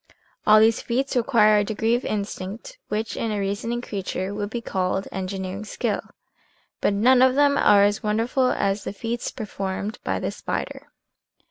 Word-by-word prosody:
All 215 Hz, 0 st, +8 dB
these 225 Hz, +1 st, +4 dB
feats 260 Hz, +3 st, -1 dB
require 225 Hz, -4 st, +4 dB
a -, -, +2 dB
degree 220 Hz, +2 st, 0 dB
of 240 Hz, -, +1 dB
instinct 210 Hz, -, -5 dB
which 215 Hz, +1 st, -3 dB
in 225 Hz, -, -2 dB
a 210 Hz, -, -1 dB
reasoning 205 Hz, +5 st, -2 dB
creature 195 Hz, -3 st, -4 dB
would 205 Hz, 0 st, -3 dB
be 240 Hz, -, -3 dB
called 190 Hz, -3 st, -2 dB
engineering 190 Hz, +1 st, -4 dB
skill, 215 Hz, -, -2 dB, 0.8 s
but -, -, +2 dB
none 245 Hz, +5 st, +4 dB
of 260 Hz, 0 st, +5 dB
them 285 Hz, 0 st, +4 dB
are 200 Hz, -6 st, +5 dB
as 205 Hz, +1 st, +2 dB
wonderful 235 Hz, +4 st, +1 dB
as 200 Hz, -2 st, 0 dB
the -, -, -5 dB
feats 230 Hz, +3 st, -3 dB
performed 200 Hz, -1 st, -5 dB
by -, -, -1 dB
the -, -, -2 dB
spider. -, -, -5 dB
215 Hz, 165 wpm, -24 LUFS, 200-235 Hz, 0.8 s, All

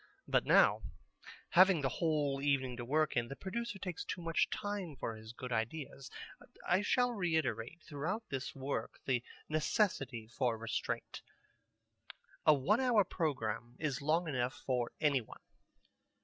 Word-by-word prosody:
But -, -, +2 dB
now, -, -, +6 dB, 0.7 s
having 185 Hz, -2 st, +6 dB
the 135 Hz, -, +1 dB
whole 145 Hz, -2 st, 0 dB
evening 135 Hz, -3 st, +1 dB
to 120 Hz, -, -4 dB
work 155 Hz, +5 st, +1 dB
in, 120 Hz, -1 st, +1 dB
the 135 Hz, -, -6 dB
producer 210 Hz, +5 st, -4 dB
takes 180 Hz, -3 st, -4 dB
too 160 Hz, -, -4 dB
much 165 Hz, -1 st, +1 dB
time 205 Hz, -7 st, -3 dB
for 115 Hz, -3 st, -4 dB
his 110 Hz, 0 st, -10 dB
good 125 Hz, +1 st, -7 dB
ideas. 130 Hz, +4 st, -3 dB, 0.6 s
I 180 Hz, +2 st, +4 dB
shall 245 Hz, +4 st, +2 dB
reiterate 160 Hz, -, -1 dB
throughout 160 Hz, +9 st, -3 dB
this 135 Hz, 0 st, -4 dB
work 135 Hz, +1 st, -3 dB
the 125 Hz, -3 st, +1 dB, 0.2 s
necessity 150 Hz, -, 0 dB
for 120 Hz, 0 st, 0 dB
restraint. 115 Hz, 0 st, -3 dB, 1.3 s
A 155 Hz, -, +9 dB
one 190 Hz, -, +2 dB
hour 245 Hz, -5 st, +4 dB
programme 120 Hz, -, -2 dB
is 145 Hz, -4 st, -2 dB
long 160 Hz, +4 st, +2 dB
enough 125 Hz, -3 st, -1 dB
for 125 Hz, -3 st, 0 dB
any 140 Hz, -4 st, +3 dB
one. 110 Hz, -, -13 dB
145 Hz, 145 wpm, -35 LUFS, 125-175 Hz, 1.3 s, A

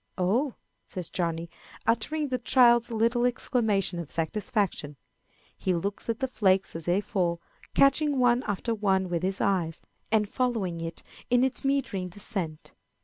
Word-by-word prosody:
"Oh!" 225 Hz, +9 st, +1 dB, 0.3 s
says 180 Hz, -4 st, -5 dB
Johnny, 170 Hz, -1 st, -2 dB, 0.4 s
uttering 280 Hz, +7 st, 0 dB
the 255 Hz, -1 st, -1 dB
child's 240 Hz, -1 st, +5 dB
little 230 Hz, +1 st, +1 dB
exclamation 220 Hz, -7 st, +1 dB
of 165 Hz, -4 st, -6 dB
satisfaction. 190 Hz, -, -1 dB, 0.6 s
He 185 Hz, -, 0 dB
looks 200 Hz, +6 st, -3 dB
at 230 Hz, +1 st, -1 dB
the 265 Hz, -, +1 dB
flakes 190 Hz, -7 st, +1 dB
as 165 Hz, -1 st, -5 dB
they 180 Hz, +3 st, +2 dB
fall, 175 Hz, -4 st, -1 dB, 0.4 s
catching 280 Hz, +1 st, +4 dB
one 245 Hz, -1 st, +4 dB
after 205 Hz, +3 st, -2 dB
another 195 Hz, -3 st, +1 dB
with 170 Hz, -2 st, -1 dB
his 190 Hz, +1 st, -1 dB
eye, 180 Hz, -5 st, +1 dB, 0.4 s
and 215 Hz, -2 st, +3 dB
following 210 Hz, -8 st, -1 dB
it 165 Hz, 0 st, -6 dB, 0.3 s
in 245 Hz, 0 st, +4 dB
its 265 Hz, -1 st, 0 dB
meandering 265 Hz, -10 st, 0 dB
descent. 180 Hz, -5 st, -5 dB
205 Hz, 145 wpm, -28 LUFS, 180-245 Hz, 0.6 s, child's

